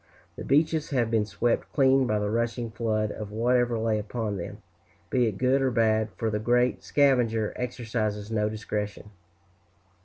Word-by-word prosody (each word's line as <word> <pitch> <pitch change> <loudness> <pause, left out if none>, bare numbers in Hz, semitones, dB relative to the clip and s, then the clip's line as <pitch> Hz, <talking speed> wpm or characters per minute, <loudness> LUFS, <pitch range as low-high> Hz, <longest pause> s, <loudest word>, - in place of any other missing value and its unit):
The - - -7
beaches 155 +2 +2
have 120 -5 0
been 110 -2 +1
swept 120 +3 -1
clean 135 -2 +4
by 110 - +1
the 105 0 -1
rushing 115 0 -1
flood, 110 -1 -1
of 105 -2 -6
whatever 120 +1 +1
lay 110 -1 0
upon 105 0 -3
them, 100 +4 -7 0.5
be 125 -2 +3
it 105 -3 -3
good 130 +3 +2
or 135 - +2
bad, 110 -2 +2
for 115 -2 -1
the 105 - -1
great 120 +3 +2
scavenger 120 -6 +2
exercises 110 -4 -3
no 105 -1 +1
discretion. 105 -1 -5
115 Hz, 160 wpm, -27 LUFS, 105-125 Hz, 0.5 s, clean